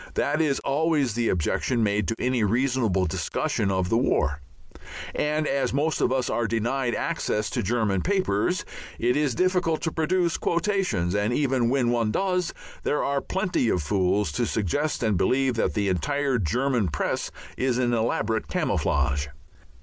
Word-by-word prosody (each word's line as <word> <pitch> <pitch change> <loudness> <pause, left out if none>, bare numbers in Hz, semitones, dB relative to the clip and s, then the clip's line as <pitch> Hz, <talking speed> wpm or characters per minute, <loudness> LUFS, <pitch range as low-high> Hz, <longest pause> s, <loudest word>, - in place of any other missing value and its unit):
That 150 +3 +1
is 145 -4 +1
always 145 -3 +1
the 115 +1 0
objection 110 - 0
made 105 -2 +1
to 115 - -1
any 125 -2 0
reasonable 115 -4 +1
discussion 90 +3 -1
of 95 -2 0
the 115 - +3
war 70 - +1 0.7
and 150 +1 0
as 135 -3 0
most 155 +3 0
of - - +2
us 130 -2 0
are 115 +1 0
denied 120 +3 -1
access 110 -10 -1
to - - -1
German 105 -3 0
papers, 185 - 0 0.3
it 120 +1 +1
is 145 -4 +1
difficult 180 -3 +1
to 160 - -1
produce 170 +2 +1
quotations; 170 - 0
and 105 +2 +1
even 130 -4 +1
when 125 -2 +2
one 115 -2 +1
does, 180 - 0 0.3
there 150 - 0
are 140 0 0
plenty 180 -10 0
of 90 -6 0
fools 95 +2 +1
to 120 +9 -1
suggest 135 - -1
and 105 -4 +2
believe 130 +6 +2
that 115 - -1
the 105 -2 +1
entire 140 +7 0
German 120 - +1
Press 75 - -2 0.3
is 130 -2 0
an 120 -1 +1
elaborate 110 -1 0
camouflage. 70 +1 0
120 Hz, 160 wpm, -25 LUFS, 105-145 Hz, 0.7 s, the